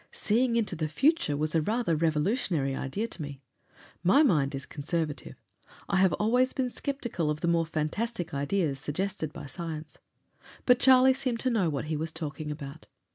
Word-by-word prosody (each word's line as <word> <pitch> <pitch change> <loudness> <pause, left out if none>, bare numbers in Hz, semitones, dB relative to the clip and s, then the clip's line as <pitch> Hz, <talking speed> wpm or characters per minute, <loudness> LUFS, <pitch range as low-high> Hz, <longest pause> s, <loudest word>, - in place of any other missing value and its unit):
Seeing 235 +3 +1
into 220 -6 0
the 155 -1 -2
future 205 - +2
was 150 +1 -1
a 165 - +3
rather 215 0 0
revolutionary 155 - 0
idea 200 +15 -3
to 205 - -7
me. 145 -2 -6 0.6
My 220 - +5
mind 150 - +2
is 135 0 -5
conservative; 150 -2 -3 0.5
I 195 - +1
have 190 -1 +4
always 245 +8 +2
been 255 -2 -1
sceptical 240 - -3
of 150 0 -2
the - - 0
more 165 -1 +2
fantastic 170 +5 -2
ideas 140 0 0
suggested 155 +2 -3
by - - -9
science. 155 +2 -7 0.7
But 250 -1 +5
Charlie 260 0 +7
seemed 255 -3 -2
to 255 - +1
know 200 -8 +2
what 145 -1 -3
he 155 0 -2
was 160 +1 -3
talking 155 -2 -5
about. 150 0 -8
165 Hz, 175 wpm, -28 LUFS, 150-230 Hz, 0.7 s, Charlie